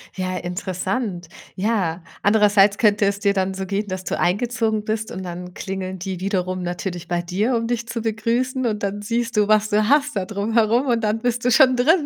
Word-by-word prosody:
Ja, 185 -1 -2
interessant. 180 +2 -3 0.3
Ja, 185 -5 -1 0.2
andererseits 205 -1 +4
könnte 210 -2 +3
es 200 0 0
dir 200 -1 +2
dann 190 -1 0
so 190 0 -4
gehen, 200 +2 -2
dass 185 -1 -5
du - - -2
eingezogen 220 +2 0
bist 220 0 -2
und 190 - -6
dann 180 0 -7
klingeln 190 -1 -5
die 185 0 -5
wiederum 185 -2 -1
natürlich 175 0 -4
bei 175 0 0
dir, 195 +8 0
um 230 0 -2
dich 235 -1 -2
zu 230 0 -4
begrüßen 235 +4 -1
und 215 -3 -1
dann 205 +1 -2
siehst 230 +3 -2
du, 210 -1 +3
was 215 0 +4
du 210 0 +2
hast 290 -1 +3
da 195 - 0
drum 205 +2 -3
herum 230 +4 +3
und 235 -2 +2
dann 215 0 0
bist 245 +1 -1
du 250 - +3
schon 260 0 +6
drin. 295 +6 +3
210 Hz, 210 wpm, -22 LUFS, 185-230 Hz, 0.3 s, schon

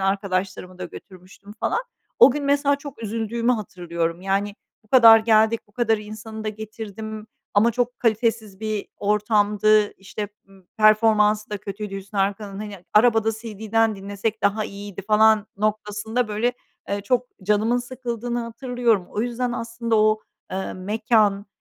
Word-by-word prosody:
arkadaşlarımı 190 -1 -2
da 180 - -5
götürmüştüm 185 +3 -13
falan. - - +1 0.4
O 465 - +9
gün 290 +2 -3
mesela 285 0 +2
çok 280 -5 -10
üzüldüğümü 230 +2 -1
hatırlıyorum. 170 -5 -3
Yani, 200 +1 -1 0.3
bu - - -28
kadar 230 -2 +9
geldik. 220 0 +3
Bu 205 - -28
kadar 225 -1 +1
insanı 215 +1 -8
da - - -1
getirdim 215 0 -7 0.3
ama 220 +3 +5
çok 245 +1 -2
kalitesiz 220 -3 0
bir 215 -2 -3
ortamdı. 210 0 +2
İşte, 200 +1 -6 0.2
ımm, 190 -2 -20
performansı 215 -1 +4
da 210 - -3
kötüydü 200 0 -6
Hüsnü 200 +1 -7
Arkan'ın. 200 0 -2
Hani, 205 -4 -8
arabada 225 0 +4
CD'den 220 0 -1
dinlesek 205 +3 -4
daha 210 +2 +2
iyiydi 200 -1 -8
falan 215 0 +4
noktasında, 215 +2 -1
böyle, 225 +4 0 0.4
eee, 200 0 -1
çok 245 +5 0 0.2
canımın 215 +5 +2
sıkıldığını 245 -1 -4
hatırlıyorum. 230 -4 0
O 210 - -2
yüzden 245 +1 -2
aslında 230 -1 -2
o, 215 0 +3 0.3
eee, 190 +1 -3
mekân, 210 +1 +1
215 Hz, 140 wpm, -23 LUFS, 200-230 Hz, 0.4 s, O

